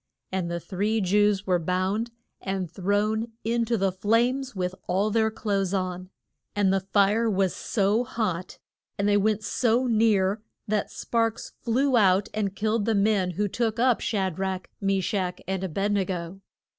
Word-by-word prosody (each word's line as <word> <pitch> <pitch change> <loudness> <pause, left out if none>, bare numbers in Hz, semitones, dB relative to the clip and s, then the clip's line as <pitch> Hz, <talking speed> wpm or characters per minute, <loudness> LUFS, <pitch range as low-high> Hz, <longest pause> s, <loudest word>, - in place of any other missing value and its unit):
And 185 -2 -1
the 170 0 -2
three 205 +5 -1
Jews 205 +1 +2
were 180 -2 +2
bound 185 +7 -1 0.3
and 190 -3 -3
thrown 210 +4 0
in 230 +1 +1
to 230 0 0
the 195 -1 +1
flames 235 +7 +1
with 180 -1 -2
all 195 +4 +1
their 220 0 +2
clothes 200 -3 -1
on. 185 -1 -3 0.5
And 200 -2 +3
the 195 - +3
fire 205 +4 +2
was 195 -3 +1
so 210 +2 +1
hot 195 -7 -3 0.4
and 200 - +1
they 205 - +4
went 215 +1 +2
so 245 +2 +1
near 215 -3 +2 0.3
that 210 -1 0
sparks 230 -1 -1
flew 255 +2 +2
out 195 -1 +4
and 200 -2 -2
killed 215 0 0
the 225 -1 +1
men 200 -2 +2
who 205 0 +1
took 225 +2 -1
up 245 0 +3
Sha 190 -4 0
drach, 190 +1 -3 0.2
Me 195 -1 +1
shach 180 -2 -1
and 190 0 -2
A 190 - -2
bed 195 +5 -1
ne 200 -1 +2
go. 180 0 -5
205 Hz, 170 wpm, -26 LUFS, 190-220 Hz, 0.5 s, they